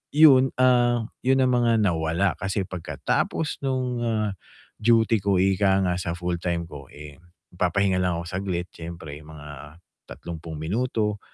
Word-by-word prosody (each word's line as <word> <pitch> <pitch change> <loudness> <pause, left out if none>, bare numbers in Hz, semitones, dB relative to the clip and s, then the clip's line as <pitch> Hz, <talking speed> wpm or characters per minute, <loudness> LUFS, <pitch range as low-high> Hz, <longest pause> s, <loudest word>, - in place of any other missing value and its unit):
yun, 135 -4 +6
ah, 120 -2 +3
yun 130 +1 +3
ang 130 - +2
mga 120 -3 +3
nawala 85 +1 0
kasi 95 +1 -1
pagkatapos 95 - -2
nung, 130 -2 -1
ah, 110 -2 0 0.5
duty 115 0 +3
ko 100 0 +1
ika 95 0 +3
nga 90 -1 +1
sa 85 -1 -3
full-time 85 -1 -2
ko, 70 -3 -10
eh, 75 -1 -11 0.4
magpapahinga 95 +1 +1
lang 90 -2 0
ako 85 - -6
saglit 90 -2 -3
siyempre, 80 -3 -8
mga 75 0 -11 0.3
30 85 -1 -8
minuto 105 +4 -1
95 Hz, 140 wpm, -25 LUFS, 85-115 Hz, 0.5 s, yun